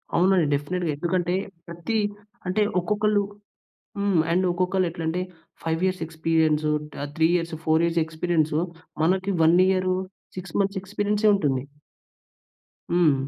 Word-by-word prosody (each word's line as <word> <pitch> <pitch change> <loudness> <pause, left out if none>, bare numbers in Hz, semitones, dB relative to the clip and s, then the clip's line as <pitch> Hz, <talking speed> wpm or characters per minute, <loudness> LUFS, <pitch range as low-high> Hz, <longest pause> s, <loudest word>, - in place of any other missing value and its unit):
అవునండి 185 -1 +4
డెఫినిట్‌గా. 165 +4 -2
ఎందుకంటే, 175 +2 0 0.3
ప్రతి 170 +6 -3 0.5
అంటే 185 +4 +1 0.2
ఒక్కొక్కళ్ళు 210 +3 +1 0.8
హ్మ్. 180 -3 +2
ఒక్కొక్కళ్ళెట్లా 180 -2 -1
అంటే 170 +3 -1 0.4
5 165 0 -1
ఇయర్స్ 185 -2 -1
ఎక్స్‌పీరియన్సు 160 -1 +1 0.3
ఆహ్, 145 - -4
3 160 0 +4
ఇయర్స్, 170 -1 -3
4 160 +1 +3
ఇయర్స్ 170 0 +1
ఎక్స్‌పీరియన్సూ 160 -1 0 0.4
మనకి 190 +3 +1
1 165 +2 +5
ఇయర్ 185 -1 +1 0.5
6 185 -2 -7
మంత్స్ 195 0 0
ఎక్స్‌పీరియన్సే 205 +2 0
ఉంటుంది. 140 -9 0 1.3
హ్మ్. 170 -4 +4
175 Hz, 115 wpm, -25 LUFS, 160-190 Hz, 1.3 s, 1